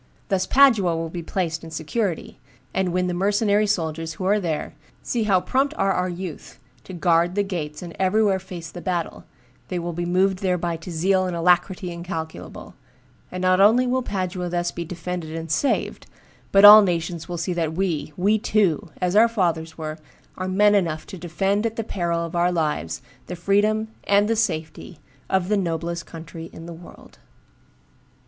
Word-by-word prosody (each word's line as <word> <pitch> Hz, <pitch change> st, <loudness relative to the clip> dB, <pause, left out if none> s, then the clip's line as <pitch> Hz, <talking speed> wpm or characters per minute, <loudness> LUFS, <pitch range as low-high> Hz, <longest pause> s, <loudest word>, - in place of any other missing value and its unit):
Thus 185 Hz, -1 st, 0 dB
Padua 225 Hz, -11 st, +5 dB
will 165 Hz, 0 st, -4 dB
be 175 Hz, -, -5 dB
placed 165 Hz, -1 st, -3 dB
in 165 Hz, -, -8 dB
security; 165 Hz, +4 st, -3 dB, 0.3 s
and 190 Hz, -1 st, 0 dB
when 180 Hz, +1 st, 0 dB
the 180 Hz, -, -1 dB
mercenary 205 Hz, +3 st, +2 dB
soldiers 165 Hz, -4 st, -2 dB
who 185 Hz, -, -5 dB
are 205 Hz, +2 st, +3 dB
there 165 Hz, -6 st, -3 dB, 0.3 s
see 230 Hz, -3 st, -1 dB
how 195 Hz, -3 st, +4 dB
prompt 275 Hz, +8 st, 0 dB
are 195 Hz, 0 st, +2 dB
our 180 Hz, 0 st, 0 dB
youth 175 Hz, -3 st, -7 dB, 0.3 s
to 185 Hz, -, -9 dB
guard 175 Hz, 0 st, +2 dB
the 205 Hz, -, +2 dB
gates 160 Hz, -5 st, -5 dB
and 170 Hz, -1 st, -9 dB
everywhere 195 Hz, +1 st, +2 dB
face 180 Hz, -4 st, -9 dB
the 175 Hz, -, -8 dB
battle, 175 Hz, -2 st, -3 dB, 0.4 s
they 180 Hz, -, -3 dB
will 175 Hz, 0 st, -3 dB
be 175 Hz, +1 st, -3 dB
moved 185 Hz, +1 st, +2 dB
thereby 180 Hz, -3 st, -1 dB
to 165 Hz, +3 st, -10 dB
zeal 185 Hz, +3 st, +1 dB
and 180 Hz, -, -3 dB
alacrity 180 Hz, +2 st, +1 dB
incalculable; 170 Hz, -2 st, -7 dB, 0.6 s
and 185 Hz, 0 st, -4 dB
not 185 Hz, +1 st, +4 dB
only 225 Hz, +5 st, +5 dB
will 255 Hz, +1 st, +1 dB
Padua 185 Hz, -5 st, -3 dB
thus 175 Hz, 0 st, -1 dB
be 170 Hz, -, -5 dB
defended 170 Hz, -1 st, -5 dB
and 165 Hz, -1 st, -5 dB
saved, 270 Hz, -, -1 dB, 0.4 s
but 195 Hz, +1 st, +7 dB
all 210 Hz, +1 st, +12 dB
nations 170 Hz, -3 st, -2 dB
will 175 Hz, -, -3 dB
see 170 Hz, +2 st, -2 dB
that 165 Hz, -2 st, -1 dB
we, 170 Hz, -4 st, -2 dB
we 205 Hz, +4 st, +2 dB
too, 200 Hz, -7 st, +1 dB
as 180 Hz, +1 st, 0 dB
our 225 Hz, +2 st, +7 dB
fathers 170 Hz, -7 st, -1 dB
were, 155 Hz, -1 st, -5 dB, 0.4 s
are 185 Hz, -, -4 dB
men 205 Hz, +2 st, +4 dB
enough 165 Hz, -6 st, 0 dB
to 195 Hz, -, -9 dB
defend 195 Hz, +4 st, -1 dB
at 225 Hz, -1 st, -2 dB
the 225 Hz, -, -2 dB
peril 170 Hz, -5 st, -2 dB
of 165 Hz, -, -7 dB
our 175 Hz, +1 st, +2 dB
lives 150 Hz, -, -2 dB, 0.2 s
the 180 Hz, -, -5 dB
freedom 210 Hz, +4 st, +1 dB, 0.2 s
and 200 Hz, +1 st, +3 dB
th 225 Hz, -1 st, +1 dB
safety 165 Hz, -4 st, -3 dB, 0.3 s
of 190 Hz, -2 st, +1 dB
the 210 Hz, -, +2 dB
noblest 170 Hz, -2 st, -3 dB
country 165 Hz, 0 st, -9 dB
in 165 Hz, -, -10 dB
the 170 Hz, -, -8 dB
world." 170 Hz, +1 st, -15 dB
180 Hz, 185 wpm, -23 LUFS, 165-195 Hz, 0.6 s, all